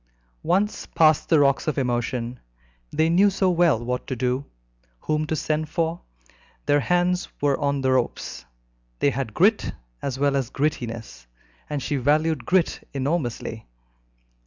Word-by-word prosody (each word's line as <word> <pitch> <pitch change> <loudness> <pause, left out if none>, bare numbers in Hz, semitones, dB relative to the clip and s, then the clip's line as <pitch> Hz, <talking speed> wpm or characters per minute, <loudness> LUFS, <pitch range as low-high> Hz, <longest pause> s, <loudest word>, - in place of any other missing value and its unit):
Once 200 +4 0
past 155 -2 +3
the 160 - +5
rocks 140 +1 +3
of 155 - 0
emotion, 120 -1 -1 0.5
they 160 - +2
knew 185 +5 +5
so 190 -1 +1
well 165 -9 +3
what 125 +1 -3
to 130 - -2
do, 125 +2 0 0.6
whom 155 0 -1
to 160 - -1
send 155 0 -1
for; 165 0 -1 0.6
their 145 - +4
hands 180 +4 +1
were 140 -1 +2
on 140 -1 +1
all 140 - -2
the 130 - +3
ropes, 125 - -1 0.5
they 140 - +2
had 125 -4 -4
grit 205 +4 +3 0.3
as 130 -2 -3
well 140 0 +2
as 135 -4 0
grittiness, 115 - -3 0.4
and 145 -3 -3
she 145 - -1
valued 150 0 +1
grit 185 -2 +2 0.2
enormously. 130 -6 -2
145 Hz, 150 wpm, -24 LUFS, 125-165 Hz, 0.6 s, the